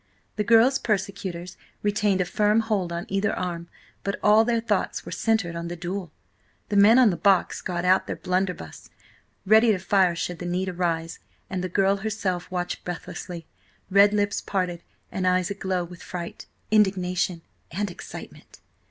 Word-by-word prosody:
The 210 - 0
girl's 235 +5 +5
persecutors 190 -4 -3 0.3
retained 205 -2 +1
a - - +1
firm 210 +4 +2
hold 205 -6 -1
on 170 0 -4
either 195 +2 0
arm, 170 -2 -4 0.4
but 200 - -2
all 210 +1 +6
their 230 0 +1
thoughts 230 - -1
were - - -7
centred 220 -7 0
on 170 0 -4
the 175 - -5
duel. 175 0 -5 0.6
The 205 - -1
men 205 +4 +7
on 250 -5 +6
the - - -2
box 190 +1 +2
got 175 -1 -3
out 185 +1 +3
their - - -3
blunderbuss, 180 - -3 0.6
ready 220 +3 +6
to 205 - +1
fire 185 -1 +2
should 175 0 -4
the 175 - -5
need 185 +2 -1
arise, 170 -2 -2 0.3
and 185 -2 -2
the 185 - -2
girl 195 +2 +2
herself 195 -4 -3
watched 180 -1 -3
breathlessly, 175 -1 -6 0.5
red 200 +1 +6
lips 205 -1 0
apart, 180 -3 -2 0.3
and 185 -1 -1
eyes 185 0 +2
aglow 190 -2 -2
with 175 0 -11
fright, 170 -2 -7 0.2
indignation, 185 -4 +1 0.3
and 200 +3 -3
excitement. - - -11
185 Hz, 165 wpm, -25 LUFS, 175-205 Hz, 0.6 s, men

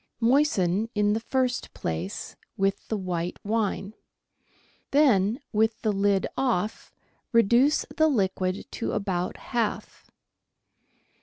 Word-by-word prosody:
Moisten, 230 -6 +2
in 210 0 +3
the 220 - 0
first 255 +2 -1
place, 80 +4 -4 0.2
with 195 0 0
the 220 - -1
white 180 -2 -3
wine; 210 -1 -1 1.0
then, 240 -6 +3
with 220 +1 +2
the 215 - +2
lid 200 0 +2
off, 225 -5 -1 0.4
reduce 235 +5 +4
the 315 -1 +5
liquid 190 -7 0
to - - -3
about 185 -3 -2
half. 235 -4 -3
210 Hz, 105 wpm, -26 LUFS, 190-240 Hz, 1.0 s, the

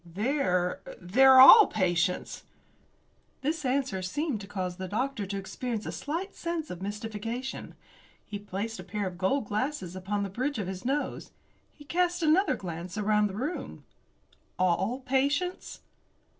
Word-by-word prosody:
"They're 180 - -1 0.2
they're 260 +9 +6
all 415 - +11
patients." 180 -3 -1 1.0
This 305 +3 -2
answer 260 -7 0
seemed 265 - -2
to 195 - -9
cause 185 -3 -4
the 190 -1 -5
doctor 225 +1 -2
to 200 +1 -3
experience 220 +3 -4
a - - -3
slight 340 +7 -4
sense 335 -2 -4
of 180 - -7
mystification. 225 +5 -5 0.5
He 205 - -6
placed 205 +3 -5
a - - -6
pair 205 +1 -3
of 180 -1 -6
gold 215 +7 +1
glasses 210 - -3
upon 200 +2 -2
the 200 - -3
bridge 260 +8 -2
of 205 - -2
his 185 0 -6
nose. 280 +3 -2 0.4
He 295 - -16
cast 350 +2 0
another 335 +6 +3
glance 175 +1 -7
around 210 0 +2
the 195 - -7
room. 280 - -5 0.7
"All 190 +7 +1
patients?" 285 +7 -1
215 Hz, 145 wpm, -28 LUFS, 190-275 Hz, 1.0 s, all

